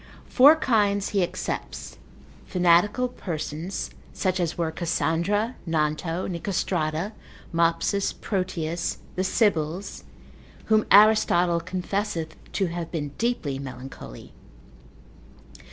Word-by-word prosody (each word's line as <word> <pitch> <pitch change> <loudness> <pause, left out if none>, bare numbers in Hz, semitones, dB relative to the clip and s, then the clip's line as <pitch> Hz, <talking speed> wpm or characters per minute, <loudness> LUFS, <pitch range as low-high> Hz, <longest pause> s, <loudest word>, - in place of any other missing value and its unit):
Four 285 +5 +7
kinds 205 -8 +1
he 200 - +1
excepts, 175 - -4 0.5
fanatical 180 +7 +3
persons, 165 -4 -5 0.2
such 185 0 0
as 175 -2 -1
were 165 -2 0
Cassandra, 170 - 0
Nanto, 165 +2 -1
Nicostrata, 175 -1 -1 0.4
Mopsus, 170 +4 +1
Proteus, 170 -4 -2 0.2
the 185 - 0
sibyls, 185 -3 0 0.6
whom 215 -1 +3
Aristotle 190 -5 +5
confesseth 180 -1 -3 0.2
to 195 - +1
have 170 -1 -4
been 150 -4 -3
deeply 195 - -1
melancholy. 130 - -9
175 Hz, 90 wpm, -25 LUFS, 165-200 Hz, 0.6 s, Four